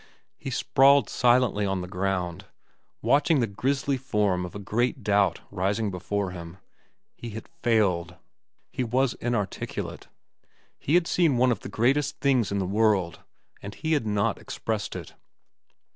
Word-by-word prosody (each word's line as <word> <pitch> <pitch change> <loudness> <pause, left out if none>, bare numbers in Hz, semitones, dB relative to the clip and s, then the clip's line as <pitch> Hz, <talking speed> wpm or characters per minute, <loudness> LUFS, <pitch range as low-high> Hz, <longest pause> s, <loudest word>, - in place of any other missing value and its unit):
He - - -5
sprawled 140 +1 +4
silently 120 -4 +3
on 95 -2 -1
the 90 - -6
ground, 90 -1 -2 0.6
watching 145 +2 +3
the 120 - +2
grisly 135 +6 -1
form 105 -8 0
of 90 - -13
a - - -5
great 120 +4 -1
doubt 100 -1 +2
rising 100 +2 -1
before 95 +1 -2
him. 85 0 -9 0.6
He 120 - -8
had 110 - -9
failed. 95 -7 0 0.6
He 130 - -2
was 125 +2 +1
inarticulate. 120 -5 -4 0.7
He 150 - +1
had 175 -1 +4
seen 165 -7 +2
one 125 +1 +4
of 110 - -1
the - - -8
greatest 130 +7 +1
things 130 -8 +2
in 100 - 0
the 95 - 0
world, 100 -3 +1 0.4
and 100 - -8
he 160 0 -1
had 140 -8 0
not 105 -1 0
expressed 110 -2 -4
it. - - -8
105 Hz, 150 wpm, -26 LUFS, 95-130 Hz, 0.7 s, sprawled